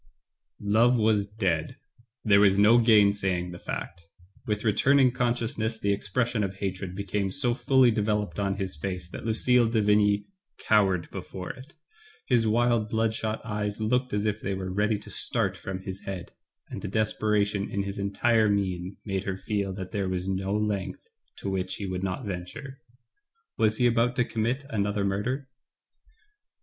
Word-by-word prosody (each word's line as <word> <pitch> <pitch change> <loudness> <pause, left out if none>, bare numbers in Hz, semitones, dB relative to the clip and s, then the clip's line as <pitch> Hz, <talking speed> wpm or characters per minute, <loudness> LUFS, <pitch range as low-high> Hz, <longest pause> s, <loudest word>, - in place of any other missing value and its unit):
Love 115 +5 +3
was 105 -2 +2
dead. 95 -7 -1 0.5
There 100 -3 +5
was 100 -1 +5
no 110 +4 +6
gainsaying 100 -5 +3
the 85 - -9
fact. 85 +1 -6 0.5
With 105 -1 -1
returning 130 +5 +4
consciousness 120 -2 -1
the 100 0 +1
expres 115 +4 -1
sion 110 -3 -1
of 95 -1 -3
hatred 95 -1 -4
became 100 0 -2
so 125 -4 +1
fully 130 0 +4
developed 105 -1 -1
on 100 -1 0
his 95 -4 -3
face 90 +2 -5
that - - -6
Lucille 120 +1 +3
de 115 -1 +1
Vigny 105 -1 +3 0.3
cowered 95 -5 +2
before 90 -1 -6
it. 130 +5 -14 0.5
His 120 -3 +2
wild 115 -1 +2
bloodshot 110 0 -1
eyes 105 -1 -3
looked 125 +4 0
as 105 +1 -1
if 105 0 -1
they 95 - -2
were 95 -1 -4
ready 105 +2 +1
to 100 - -12
start 100 -6 0
from 95 +1 -6
his 95 0 -6
head, 95 -3 -6 0.4
and - - -5
the - - -4
desperation 105 -1 0
in 100 - -1
his 100 +1 -5
entire 110 +3 +2
mien 95 -2 -1
made 95 -2 -2
her 95 -1 -2
feel 100 -1 -2
that 95 -2 -6
there 100 -3 -1
was 90 0 -2
no 95 0 -2
length 100 -3 -2 0.3
to - - -7
which 95 -1 -2
he 100 - -5
would 95 -1 -3
not 95 0 -3
venture. 105 +9 -6 0.8
Was 110 -1 +2
hs 125 - +2
about 120 +1 +2
to 125 - +2
commit 120 +5 -2
another 100 -2 0
murder? 125 +8 -2
105 Hz, 165 wpm, -27 LUFS, 95-115 Hz, 0.8 s, no